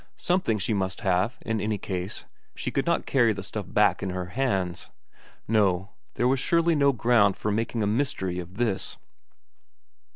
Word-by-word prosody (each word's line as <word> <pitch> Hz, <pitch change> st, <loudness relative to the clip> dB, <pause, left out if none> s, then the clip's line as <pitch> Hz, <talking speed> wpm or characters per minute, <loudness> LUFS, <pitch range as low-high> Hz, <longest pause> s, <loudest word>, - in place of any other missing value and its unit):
Something 175 Hz, -, +1 dB
she 105 Hz, +2 st, -1 dB
must 95 Hz, +1 st, -2 dB
have, 95 Hz, +3 st, +1 dB
in 110 Hz, -1 st, -2 dB
any 105 Hz, 0 st, -1 dB
case; 95 Hz, 0 st, -5 dB, 0.3 s
she -, -, -3 dB
could -, -, -1 dB
not -, -, +1 dB
carry 120 Hz, -4 st, +3 dB
the 100 Hz, -1 st, -6 dB
stuff 105 Hz, +1 st, -5 dB
back 105 Hz, -1 st, +3 dB
in 95 Hz, -, -2 dB
her 90 Hz, -1 st, -4 dB
hands. 95 Hz, -9 st, -1 dB, 0.6 s
No, 100 Hz, -3 st, +2 dB, 0.2 s
there 120 Hz, -, +2 dB
was 130 Hz, +1 st, +2 dB
surely 170 Hz, +4 st, +2 dB
no 140 Hz, -2 st, +4 dB
ground 115 Hz, -5 st, +3 dB
for 105 Hz, -, -2 dB
making 115 Hz, +1 st, -1 dB
a -, -, +2 dB
mystery 105 Hz, -6 st, -1 dB
of 90 Hz, +2 st, -9 dB
this. 115 Hz, -5 st, 0 dB
105 Hz, 170 wpm, -26 LUFS, 95-120 Hz, 0.6 s, no